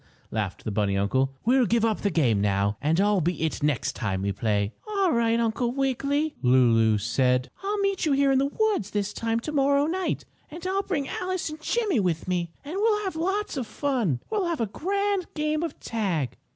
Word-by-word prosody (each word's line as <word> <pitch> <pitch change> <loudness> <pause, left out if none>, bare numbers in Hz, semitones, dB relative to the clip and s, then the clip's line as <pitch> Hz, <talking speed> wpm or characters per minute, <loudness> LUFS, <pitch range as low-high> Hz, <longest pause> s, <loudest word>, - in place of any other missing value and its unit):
laughed 105 -4 -3
the 110 - -3
bunny 100 -1 0
uncle. 130 +7 +1
"We'll 250 0 +4
give 230 -1 +2
up 220 -2 0
the 205 - +1
game 125 - +2
now, 100 0 +1
and 155 +4 +2
I'll 205 -1 +3
be 175 0 -1
'it' 160 0 -1
next 145 -3 0
time 95 -4 -2
when 100 - -1
we - - +1
play." 100 +1 0 0.2
"Ail 395 -4 +2
right, 230 -2 +2
Uncle 235 +1 0
Wiggily," 275 +3 0 0.7
said 125 +4 +1
Lulu. - - -30
"I'll 410 +2 -1
meet 395 -4 0
you 290 - +3
here 275 0 +3
in 265 - +4
the 275 - +2
woods 405 - 0
at - - -22
this 205 0 -1
time 230 0 -1
tomorrow 280 +1 +2
night, 365 +4 -2 0.2
and 335 +3 -9
I'll 385 +1 +1
bring 325 -9 -2
Alice 365 -3 -3
and 310 +1 -9
Jimmie 420 - +1
with 175 -4 -1
me, 175 -2 -1
and 320 +6 -5
we'll 420 0 +2
have 380 -4 -3
lots 385 +2 -1
of 250 -4 -3
fun. 225 - -1
We'll 410 -5 0
have 335 -2 -2
a 230 - +1
grand 395 - -1
game 305 0 0
of 335 - -4
tag!" 185 - -2
235 Hz, 210 wpm, -26 LUFS, -, 0.7 s, We'll